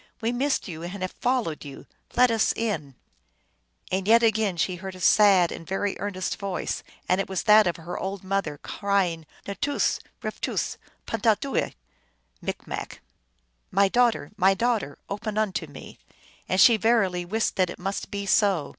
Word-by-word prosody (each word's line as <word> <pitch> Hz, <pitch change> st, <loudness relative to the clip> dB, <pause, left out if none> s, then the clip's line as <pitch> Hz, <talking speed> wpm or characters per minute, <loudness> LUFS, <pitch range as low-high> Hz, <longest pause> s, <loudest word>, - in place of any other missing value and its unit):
" -, -, -34 dB
We 230 Hz, -, +1 dB
missed 265 Hz, +2 st, 0 dB
you, 165 Hz, -3 st, -7 dB
and 185 Hz, +3 st, -5 dB
have 185 Hz, -, -2 dB
followed 245 Hz, -11 st, -1 dB
you. 140 Hz, -2 st, -10 dB, 0.3 s
Let 250 Hz, 0 st, +5 dB
us 225 Hz, -1 st, +2 dB
in! 160 Hz, -, -3 dB, 0.5 s
" -, -, -30 dB
And 190 Hz, +1 st, -1 dB
yet 230 Hz, +2 st, +6 dB
again 220 Hz, -4 st, +2 dB
she 180 Hz, +3 st, 0 dB
heard 190 Hz, +1 st, -7 dB
a -, -, -11 dB
sad 190 Hz, -2 st, +5 dB
and -, -, -7 dB
very 195 Hz, +1 st, -1 dB
earnest 190 Hz, -3 st, -3 dB
voice, 195 Hz, -2 st, -3 dB, 0.3 s
and 185 Hz, +2 st, +3 dB
it -, -, -6 dB
was 190 Hz, -2 st, -2 dB
that 215 Hz, -2 st, +6 dB
of 175 Hz, -, 0 dB
her 170 Hz, +1 st, -6 dB
old 195 Hz, 0 st, -4 dB
mother, 190 Hz, -6 st, -1 dB
cry 200 Hz, +4 st, 0 dB
ing, 165 Hz, -2 st, -8 dB
" -, -, -26 dB
N 200 Hz, -, -4 dB
toos\ 285 Hz, 0 st, +1 dB, 0.2 s
rftoos\pantahdooel" 225 Hz, +4 st, -2 dB, 0.7 s
M., -, -, -4 dB, 0.8 s
"My 195 Hz, +1 st, +3 dB
daugh 245 Hz, +2 st, +4 dB
ter! 145 Hz, -, -9 dB
my 195 Hz, 0 st, +4 dB
daughter! 220 Hz, -10 st, 0 dB
open 210 Hz, +1 st, -4 dB
unto 190 Hz, -7 st, -1 dB
me! 145 Hz, -2 st, -12 dB, 0.2 s
" -, -, -28 dB
and 185 Hz, -, +1 dB
she 230 Hz, +3 st, +8 dB
verily 195 Hz, -5 st, +2 dB
wist 215 Hz, +6 st, -1 dB
that 185 Hz, -2 st, +2 dB
it -, -, -7 dB
must 195 Hz, +2 st, -4 dB
be 200 Hz, 0 st, -4 dB
so. 195 Hz, -7 st, +2 dB
195 Hz, 180 wpm, -26 LUFS, 180-220 Hz, 0.8 s, she